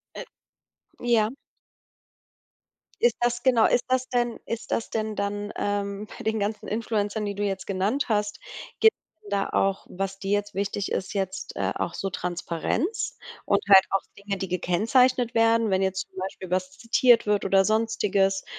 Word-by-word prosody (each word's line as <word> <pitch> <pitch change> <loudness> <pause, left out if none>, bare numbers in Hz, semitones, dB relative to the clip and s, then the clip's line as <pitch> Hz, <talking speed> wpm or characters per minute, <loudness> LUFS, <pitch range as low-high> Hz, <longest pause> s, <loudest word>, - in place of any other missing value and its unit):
Äh. - - -6 0.8
Ja. 230 -3 +2 1.7
Ist 240 -1 +4
das 240 0 0
genau, 245 -4 +5
ist - - +3
das 255 0 +1
denn 240 -2 0
ist 230 - -5
das 230 - -1
dann, 205 -1 -3
ähm, 205 0 -2
bei - - -8
den 220 0 0
ganzen 210 +1 -3
Influencern, 215 -1 -1
die 200 -1 -3
du 205 - -2
jetzt 195 -1 -2
genannt 200 +8 0
hast, 210 -1 0 0.4
gibt 445 - +6 0.3
es 205 - -13
da 200 -1 0
auch, 195 0 0
was 195 +1 -4
dir 195 0 -3
jetzt 205 -1 -1
wichtig 200 0 -2
ist, 190 - -2
jetzt, 190 -1 -3
äh, - - 0
auch 170 - -2
so 195 - -3
Transparenz 180 - -2 0.3
und 200 - +3
halt 190 -1 +9
auch 195 - +2 0.2
Dinge, 200 0 -4
die 190 - -4
gekennzeichnet 230 +8 +2
werden, 225 -1 +4
wenn 190 0 +2
jetzt 190 0 -1
zum - - -20
Beispiel 185 -1 -5
was 185 +1 -1
zitiert 235 +1 +4
wird 205 -1 +2
oder 195 0 +4
Sonstiges, 205 -3 +1
205 Hz, 165 wpm, -26 LUFS, 195-230 Hz, 1.7 s, halt